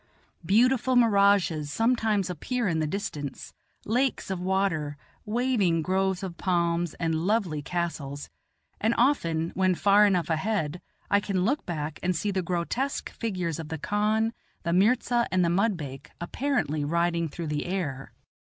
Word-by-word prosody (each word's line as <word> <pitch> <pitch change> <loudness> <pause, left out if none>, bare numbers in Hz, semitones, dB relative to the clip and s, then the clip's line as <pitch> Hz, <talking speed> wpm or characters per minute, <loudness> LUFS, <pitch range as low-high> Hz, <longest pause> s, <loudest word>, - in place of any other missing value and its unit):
Beautiful 250 +4 +3
mirages 200 -9 +3
sometimes 220 -2 +1
appear 230 - -2
in 165 -3 0
the 155 - 0
distance 150 -6 -5 0.3
lakes 245 -2 0
of 190 - -2
water, 180 -6 0 0.3
waving 210 -8 +1
groves 190 +1 0
of 175 -3 -5
palms, 170 -2 0
and 165 -1 -1
lovely 175 -2 0
castles; 145 -4 -4 0.5
and 225 +2 +1
often, 170 - +1
when 185 -1 +2
far 205 +3 +5
enough 180 -4 +1
ahead, 175 -1 -1 0.3
I 200 - +5
can 195 -3 -1
look 280 +7 0
back, 155 -3 -4
and 185 0 0
see 200 +6 -1
the 190 -1 0
grotesque 180 +11 -2
figures 180 -8 -3
of 160 - -6
the 160 - -3
khan, 215 +6 0 0.3
the 170 -2 0
mirza, 235 +5 +3
and 185 -1 +3
the - - +2
mudbake 170 -8 -1
apparently 175 - -1
riding 170 +1 0
through 170 +3 -6
the 150 +2 -2
air. 155 -8 -3
185 Hz, 145 wpm, -27 LUFS, 165-215 Hz, 0.5 s, far